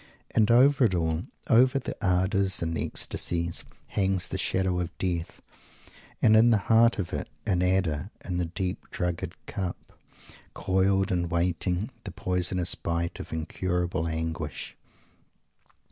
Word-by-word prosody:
And 110 -2 +3
over 130 +3 +6
it 95 -5 +1
all, 80 +1 0 0.2
over 130 +4 +5
the 135 - -4
ardours 95 0 +2
and 80 0 -2
ecstasies, 85 +1 -1 0.3
hangs 95 -2 +1
the - - -3
shadow 95 -2 0
of 90 -1 -4
Death; 85 -3 -3 0.8
and 110 - +6
in 115 +2 +6
the 115 - +5 0.2
heart 115 +1 +5
of 95 -5 -3
it, - - -3 0.2
an 95 -4 +1
adder 90 -2 +1 0.2
in 90 -2 -2
the 90 - 0
deep 90 +2 -4
drugged 90 0 -3
cup, 95 -4 -5 0.6
coiled 95 +1 +2
and 85 -2 0
waiting, 90 - 0
the 95 - -6
poisonous 90 -1 0
bite 85 +1 -3
of - - -8
incurable 90 +1 -2
anguish! 80 -3 -4
90 Hz, 135 wpm, -27 LUFS, 85-95 Hz, 0.8 s, over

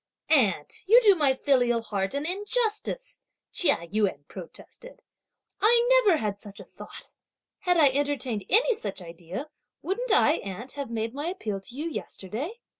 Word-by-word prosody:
"Aunt, 205 - +2
you 460 +5 +8
do 410 -2 +7
my 290 -7 +3
filial 245 -4 +2
heart 195 0 -3
an 285 +1 -2
injustice," 430 +6 -2 0.3
Chia 315 - +2
Yün 190 -7 -1
protested; - - -11 0.6
"I 480 +3 +5
never 355 -5 +5
had 205 -5 -3
such 205 -1 -12
a - - -9
thought; - - -11 0.5
had 360 -3 +1
I 295 -4 +6
entertained 270 -6 -2
any 475 +4 +4
such 205 - -5
idea, 175 - -8 0.3
wouldn't 470 +6 -2
I, 320 -6 +4
aunt, 200 +7 -7
have 280 -3 -6
made 225 0 -3
my 290 +4 -4
appeal 220 - -4
to 240 +5 -12
you 305 +4 -4
yesterday? 295 - -6
280 Hz, 155 wpm, -26 LUFS, -, 0.6 s, you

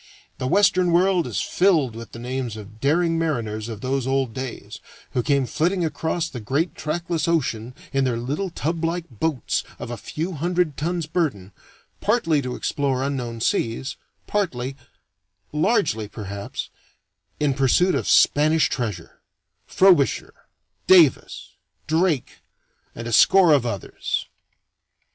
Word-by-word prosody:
The 130 - -2
Western 185 +1 +3
World 180 0 +3
is - - -2
filled 160 - +2
with 115 0 -9
the - - -9
names 125 -1 -4
of 105 +1 -11
daring 165 +3 +2
mariners 115 -9 -2
of 110 -2 -7
those 130 0 -1
old 135 -3 0
days, 120 -5 -6 0.3
who 125 - 0
came 140 +1 +1
flitting 175 +6 0
across 160 +2 -2
the 125 - -7
great 140 - -1
trackless 165 +2 -2
ocean 125 -7 -1 0.2
in 135 0 +2
their 125 -3 0
little 145 +11 -3
tublike 165 +1 -2
boats 125 +2 -1
of - - -7
a 120 - -4
few 160 - -4
hundred 175 -1 0
tons 170 +1 -2
burden, 145 - -2 0.5
partly 185 -9 +2
to 125 -2 -4
explore 135 -2 -1
unknown 125 -5 -3
seas, 115 +4 -1 0.3
partly 135 -11 -2 0.8
largely, 150 - +1
perhaps 100 -1 -6 0.7
in 145 -2 +2
pursuit 140 +7 +3
of - - -1
Spanish 155 +2 +4
treasure: 105 -10 -5 0.5
Frobisher, 180 -8 +3 0.5
Davis, 170 -8 +4 0.3
Drake, 160 -2 0 0.5
and 115 +1 -6
a 115 - -3
score 180 - +6
of 130 -4 +2
others. 100 -5 -3
140 Hz, 130 wpm, -23 LUFS, 120-170 Hz, 0.8 s, score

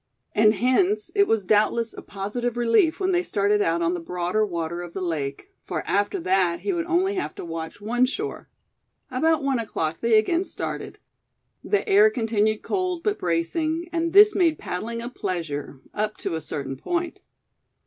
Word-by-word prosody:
And 215 0 +5
hence, 360 - +2
it 400 -1 +4
was 215 -4 +1
doubtless 215 +3 +2
a - - -9
positive 225 +5 -4
relief 240 +8 +3
when 380 -1 +1
they 355 -1 +2
started 205 - +1
out 170 -2 +1
on 170 +1 +1
the 175 - -2
broader 180 +5 -1
water 170 -3 -3
of 175 -1 -8
the - - -4
lake; 150 -6 -3
for - - -4
after 205 +1 0
that 185 -1 +1
he 395 - -1
would 335 -1 -2
only 360 +3 +2
have 375 - -3
to - - -7
watch 165 +2 -6
one 240 +5 +1
shore. 420 +11 -5 0.6
About 310 +4 +2
one 270 -3 +1
o'clock 165 -8 -3
they 230 -1 +4
again 335 - +2
started. - - -6 0.7
The 410 - 0
air 415 +1 +6
continued 220 - 0
cold, 365 -3 -2
but 415 -1 0
bracing, 310 - -1
and 335 0 0
this 415 +2 +8
made 330 -5 +2
paddling 230 +6 -4
a - - -4
pleasure, 155 - -4
up 215 0 -2
to - - -4
a 160 - -2
certain 140 -3 -4
point. 345 - -3
225 Hz, 180 wpm, -24 LUFS, -, 0.7 s, this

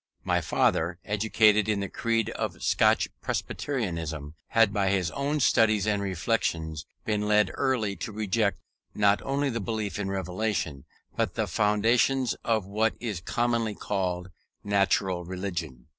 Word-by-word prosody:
My - - +1
father, 85 +2 +1
educated 105 0 +3
in 105 -2 +1
the 100 - -2
creed 115 +3 -1
of - - -4
Scotch - - +3
Presbyterianism, 85 - -3
had 115 -3 +3
by 100 -2 +1
his 95 -4 +1
own 145 +2 -1
studies 110 -6 +3
and 105 -2 +1
reflections 85 -4 -1 0.2
been 105 -1 0
early 105 +3 +2
led 100 - -9
to - - -4
reject 105 0 0 0.4
not 100 -1 +3
only 140 0 0
the 115 - -2
belief 105 -1 -3
in 100 -1 -2
Revelation, 95 -6 -2 0.3
but - - -1
the - - 0
foundations 115 +5 +2
of 110 -4 +1
what 110 +3 0
is 105 -8 -4
commonly 115 +1 0
called 90 -3 -2 0.3
Natural 95 -2 +1
Religion. 85 -8 -5
105 Hz, 140 wpm, -27 LUFS, 95-110 Hz, 0.4 s, educated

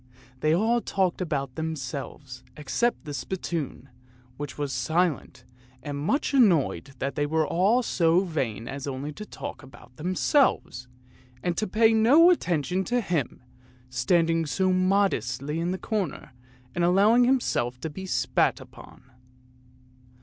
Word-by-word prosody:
They 155 +3 +1
all 230 +5 +2
talked 190 -4 -1
about 140 -7 -2
themselves 140 -4 -6
except 195 - -1
the 145 - -6
spittoon, 155 -2 -4 0.5
which 145 +1 -7
was 145 -2 -3
silent 160 +5 -1 0.4
and 145 0 -5
much 170 - -1
annoyed 170 - +2
that 135 +2 -3
they 145 +2 -1
were 160 +1 +1
all 200 - +2
so 170 -4 +2
vain 130 - -3
as 140 +2 -6
only 140 +2 -4
to 210 +6 -9
talk - - -7
about 125 -2 -16
themselves, 185 - +1 0.6
and 175 -1 0
to 215 - -1
pay 225 +3 +4
no 280 +11 +6
attention 180 - 0
to 245 0 +1
him, 170 - -2 0.5
standing 165 +5 +1
so 185 +5 +1
modestly 165 - 0
in 170 +1 -1
the 185 - -2
corner 190 -9 -3 0.4
and 175 - -1
allowing 205 +7 +5
himself 125 - 0
to 160 - -3
be 190 +5 -7
spat - - +1
upon. - - -14
165 Hz, 135 wpm, -26 LUFS, 140-195 Hz, 0.6 s, no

